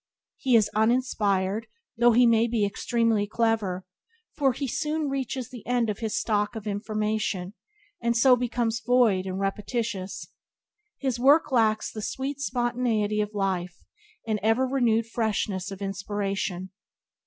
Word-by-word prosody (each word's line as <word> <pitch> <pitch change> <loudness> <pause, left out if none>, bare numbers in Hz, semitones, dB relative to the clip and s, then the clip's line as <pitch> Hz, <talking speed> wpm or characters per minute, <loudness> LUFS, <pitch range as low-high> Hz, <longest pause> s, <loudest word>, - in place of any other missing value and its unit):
He 255 -3 +2
is 220 -3 +5
uninspired 215 -3 +1 0.3
(though 240 +1 +5
he 245 +2 +6
may 230 0 +4
be 225 -3 +1
extremely 220 +1 0
clever), 215 -5 0 0.5
for 275 -3 +3
he 275 +3 -4
soon 300 +4 -1
reaches 265 -2 -3
the 245 -4 -9
end 240 -3 +1
of 205 - -7
his 220 -2 -1
stock 210 0 0
of 220 -1 -6
information, 210 -2 -2 0.5
and 235 0 +1
so 250 +2 +6
becomes 240 -1 -1
void 225 -6 +3
and 190 0 -3
repetitious. 200 0 -3 0.7
His 260 -4 -2
works 285 +4 +5
lack 220 -3 +3
the 215 - -5
sweet 270 +5 -4
spontaneity 240 -5 0
of 210 0 -4
life 185 -3 -2 0.4
and 215 -2 -1
ever 225 +5 +2
renewed 240 -4 +2
freshness 215 -4 -2
of 195 0 -7
inspiration. 195 -1 -3
225 Hz, 140 wpm, -26 LUFS, 205-245 Hz, 0.7 s, he